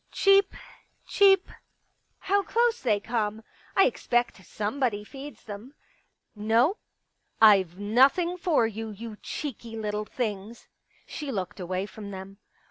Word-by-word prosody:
Cheep. 395 0 +4 0.5
Cheep. 390 -2 +4 0.7
How 400 +1 +2
close 470 +3 +1
they 215 -5 +2
come. 220 -1 -2 0.3
I 390 - +6
expect 240 -5 0
somebody 210 +2 -2
feeds 275 +6 -10
them. 220 +6 -9 0.6
No, 230 - +2 0.6
i68 215 -2 +8
Pictures - - -23
IVe - - -16
nothing 270 - +3
for 335 -9 +2
you, 225 0 -4
you 215 +1 -8
cheeky 235 -5 -6
little 210 -1 -3
things... 215 -1 -5 0.2
." - - -35
She 290 -2 -6
looked 190 -5 -4
away 185 +1 -2
from 210 0 -9
them. 195 +1 -9
225 Hz, 130 wpm, -27 LUFS, 210-285 Hz, 0.7 s, i68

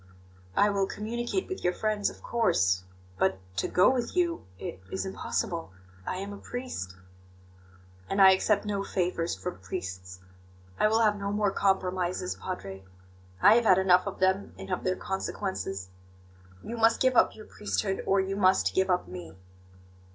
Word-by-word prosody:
"I 205 0 +4
will 195 -1 +1
communicate 235 - -3
with 375 - -6
your 180 - +2
friends, 215 0 0
of - - -14
course. 95 - +2 0.3
But 95 0 +2 0.2
to - - +1
go 185 +7 +5
with 245 +2 -2
you 345 - 0
it 95 - -7
is 95 0 -2
impossible 95 -2 -3 0.3
I - - -1
am 200 +2 -5
a 200 - -9
priest." 245 - -6 1.1
"And 195 - -1
I 190 -1 +9
accept 205 +2 +2
no 200 -1 -1
favours 175 -3 -1
from 90 -1 -6
priests. 95 -1 -6 0.6
I - - +5
will 220 +1 +3
have 210 -2 +3
no 200 0 -2
more 205 -1 +1
compromises, 185 -2 0
Padre; 95 - -6 0.6
I 205 - +9
have 235 - +1
had 185 -4 +6
enough 185 -1 +4
of - - -4
them, 190 +1 +1
and - - -8
of 180 - -1
their 185 0 +1
consequences. 190 - -4 0.7
You 235 - -5
must 225 0 +4
give 260 -1 +3
up - - +4
your 215 - -11
priesthood, 205 -2 -2
or 195 - +4
you 190 0 -1
must 190 -1 +3
give 190 0 +2
up 180 - +1
me." 90 -2 -9
190 Hz, 165 wpm, -28 LUFS, 165-210 Hz, 1.1 s, I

